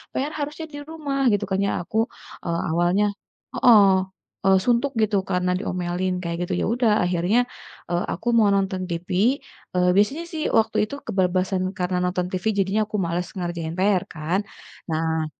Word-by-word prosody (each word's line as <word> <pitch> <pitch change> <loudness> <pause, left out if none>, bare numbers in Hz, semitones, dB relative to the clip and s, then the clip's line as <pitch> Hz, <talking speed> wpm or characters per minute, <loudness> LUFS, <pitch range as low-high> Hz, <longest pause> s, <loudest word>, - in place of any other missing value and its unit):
PR 285 +3 -1
harusnya 300 +3 -4
di 290 - -6
rumah 290 -4 -3
gitu 205 0 +1
kan. 190 0 0
Ya - - +1
aku, 220 - -4 0.5
eee, 170 -1 -1
awalnya 175 +5 +2 0.5
heeh, 215 -6 +7 0.6
eee, 190 0 +6
suntuk 250 +3 +2
gitu 210 -1 +2
karena 180 -1 0
diomelin 180 -1 -2
kayak 170 0 -3
gitu, 185 - -3
ya - - +1
udah 235 -2 +2
akhirnya, 180 +6 +2 0.5
eee, 175 0 0
aku 240 - -8
mau 210 -2 +5
nonton 190 -1 -1
TV 170 +2 -5 0.7
eee, 180 0 +3
biasanya 270 +11 +2
sih 315 -2 -4
waktu 225 - +2
itu 280 - -7
kebablasan 185 0 +1 0.2
karena 180 0 0
nonton 180 0 -1
TV 185 +1 -4
jadinya 195 +3 +1
aku 210 - -3
males 175 +1 -2
ngerjain 170 -2 -3
PR 190 -1 +3
kan, 165 +5 -1 0.5
nah 160 0 0
185 Hz, 165 wpm, -23 LUFS, 175-220 Hz, 0.7 s, heeh